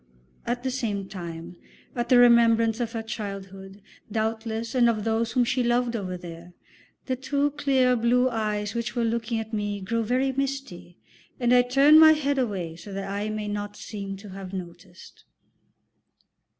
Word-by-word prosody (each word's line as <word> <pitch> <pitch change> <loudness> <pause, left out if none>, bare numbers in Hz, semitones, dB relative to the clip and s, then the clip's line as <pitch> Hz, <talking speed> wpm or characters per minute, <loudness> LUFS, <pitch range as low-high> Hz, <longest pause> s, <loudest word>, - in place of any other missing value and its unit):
At 245 +1 -2
the 260 - -1
same 210 -6 -3
time, 170 -2 -8 0.4
at 240 -1 -2
the 250 - +6
remembrance 230 -2 +5
of 235 -1 -3
her 225 -1 -3
childhood, 195 -2 -7 0.3
doubtless, 220 +1 -2
and 245 -2 +4
of 215 -2 -1
those 225 +1 0
whom 250 - +3
she 250 +2 0
loved 240 0 +1
over 185 -4 -4
there, 170 0 -11 0.5
the 260 - -1
two 280 +2 0
clear 270 -3 +2
blue 245 +2 +3
eyes 210 -3 -2
which 235 +1 -3
were 240 - 0
looking 230 0 -1
at 220 0 -7
me 205 -1 -2
grow 230 +4 -2
very 255 +4 +1
misty, 270 -10 -4 0.4
and 245 -1 +2
I 250 - +7
turn 275 +5 +6
my 315 0 +9
head 285 -2 0
away 190 -9 -2
so 200 +4 -11
that 195 0 -4
I 205 +2 -2
may 215 -1 -4
not 205 0 -4
seem 200 -2 -6
to 200 +1 -12
have 190 0 -9
noticed. 175 0 -10
225 Hz, 170 wpm, -25 LUFS, 200-245 Hz, 0.5 s, my